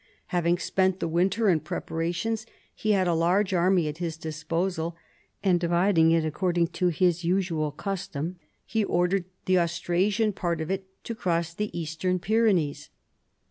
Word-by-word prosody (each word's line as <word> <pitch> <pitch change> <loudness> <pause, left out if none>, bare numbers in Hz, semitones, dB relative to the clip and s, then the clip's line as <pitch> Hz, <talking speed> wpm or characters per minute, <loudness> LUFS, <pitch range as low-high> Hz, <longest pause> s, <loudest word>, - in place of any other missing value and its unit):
Having 175 0 +2
spent 190 0 +1
the - - -1
winter 185 +7 +1
in 175 -5 +4
preparations 170 +8 -3 0.4
lie 215 0 +3
had 190 -2 +2
a 175 - +2
large 180 +4 +2
army 180 -2 +3
at 150 +2 -5
his 165 -3 -3
disposal, 165 +2 -2 0.5
and 185 -3 +3
dividing 170 -1 +3
it 165 -1 +3
according 170 +2 0
to 180 - 0
his 175 0 +2
usual 170 -3 0
custom, 180 0 -4 0.3
he 220 -1 0
ordered 180 0 +1 0.2
the 185 -1 +4
Austrasian 180 +5 +1
part 170 -3 -2
of 160 +3 -3
it 190 0 -3 0.2
to 230 - -4
cross 170 -5 -1
the 210 +4 -2
Eastern 165 +3 -1
Pyrenees. 195 -7 +1
175 Hz, 150 wpm, -27 LUFS, 165-190 Hz, 0.5 s, in